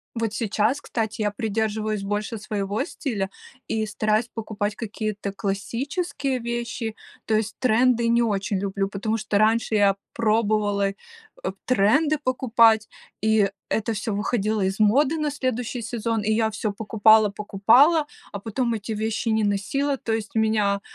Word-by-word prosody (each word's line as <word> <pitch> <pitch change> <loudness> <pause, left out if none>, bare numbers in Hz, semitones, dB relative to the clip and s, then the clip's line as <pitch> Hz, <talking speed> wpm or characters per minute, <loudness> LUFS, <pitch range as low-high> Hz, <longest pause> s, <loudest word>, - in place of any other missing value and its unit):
Вот 225 -2 -1
сейчас, 220 +4 0
кстати, 220 -3 -3
я 210 - +1
придерживаюсь 215 -1 -2
больше 205 +2 -3
своего 205 0 -2
стиля 215 - -3 0.4
и 220 -1 -1
стараюсь 215 +2 0
покупать 210 -2 -3
какие-то 210 -2 -4
классические 255 - -2
вещи, 235 -1 -4 0.3
то 220 - 0
есть 215 0 0
тренды 245 -1 +3
не 235 +1 +3
очень 200 -3 0
люблю, 195 0 -1
потому 210 +3 -2
что 210 -1 0
раньше 220 +1 +2
я 200 -2 +4 0.2
пробовала, 215 -3 +1
э, - - -10 0.7
тренды 255 +7 +3
покупать, 230 -4 +3 0.3
и 215 -2 +3 0.2
это 220 +1 0
всё 210 0 -3
выходило 210 +1 0
из 190 +1 0
моды 260 +9 +3
на 305 -1 0
следующий 250 -3 -2
сезон, 230 0 -2
и 210 - 0
я 220 0 +2
всё 215 -1 -2
покупала-покупала, 220 - +4 0.3
а 200 - -4
потом 235 +3 -1
эти 220 +1 -4
вещи 220 +1 -1
не 220 0 +2
носила. 270 +8 0
То 230 - -4
есть 220 0 -3
у - - +4
меня 210 -2 +2
220 Hz, 145 wpm, -24 LUFS, 205-235 Hz, 0.7 s, я